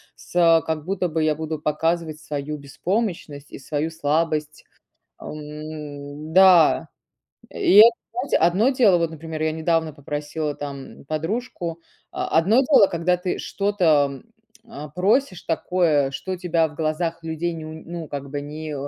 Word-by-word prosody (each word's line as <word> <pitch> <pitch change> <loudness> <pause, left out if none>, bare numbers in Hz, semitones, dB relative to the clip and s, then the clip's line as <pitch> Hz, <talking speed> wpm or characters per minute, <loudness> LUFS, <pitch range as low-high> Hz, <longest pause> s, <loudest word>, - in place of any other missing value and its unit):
с 165 -2 +3
как 155 -2 -3
будто 185 -1 -1
бы 160 0 -1
я 155 0 +2
буду 155 0 -4
показывать 160 +1 -1
свою 150 -1 -5
беспомощность 150 0 -3
и - - -8
свою 150 +3 -2
слабость, 155 -1 -1 0.6
м. 150 0 -8
Да, 185 -3 +6 0.6
и 190 - +2
это, 225 +2 +10 0.2
знаете, 245 +4 0
одно 180 +8 +3
дело, 225 -9 +4
вот, 165 -1 0
например, 160 0 -6
я 155 - +1
недавно 160 0 0
попросила 145 +1 -4
там 140 -2 -8
подружку 170 - -4 0.3
о - - -4
одно 190 +8 +4
дело, 270 -6 +5
когда 175 +1 +1
ты 180 0 -3
что-то, 160 -9 +1 0.4
а, 225 -10 -9
просишь 190 - +1
такое, 165 -4 +1
что 185 +7 -5
тебя 170 -2 +1
в 150 - -15
глазах 165 +2 -2
людей, 165 +1 -3
ню 160 -1 -7 0.2
ну 170 -2 -6
как 140 -1 -6
бы, 145 0 -3
не 150 +1 -6
160 Hz, 145 wpm, -23 LUFS, 150-175 Hz, 0.6 s, это